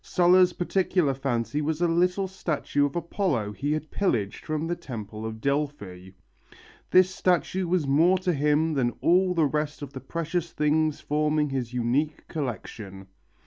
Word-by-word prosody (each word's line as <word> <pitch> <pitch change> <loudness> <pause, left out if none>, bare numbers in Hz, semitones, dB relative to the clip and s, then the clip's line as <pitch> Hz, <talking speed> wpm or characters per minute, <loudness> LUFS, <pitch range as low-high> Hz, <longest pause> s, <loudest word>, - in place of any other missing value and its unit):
Sulla's 180 0 +4
particular 180 -4 +1
fancy 130 0 -2
was 155 +1 -1
a 175 - +2
little 180 +3 +1
statue 155 -6 -1
of 140 - -10
Apollo 170 - -1
he 140 +7 -3
had 155 0 -4
pillaged 115 - -1
from 155 0 -2
the 175 +1 -1
temple 110 -6 -7
of 110 0 -7
Delphi. 140 -10 -3 0.8
This 185 0 +5
statue 185 0 0
was 175 -3 +1
more 165 +7 +4
to 185 -1 0
him 150 +2 +2
than 125 -4 0
all 180 +1 +3
the 165 -2 +3
rest 150 +1 -2
of 140 -1 -8
the 130 - -7
precious 170 +3 -3
things 155 0 +1
forming 150 0 0
his 125 -3 -3
unique 125 +5 -1
collection. 105 - -6
150 Hz, 155 wpm, -26 LUFS, 130-175 Hz, 0.8 s, This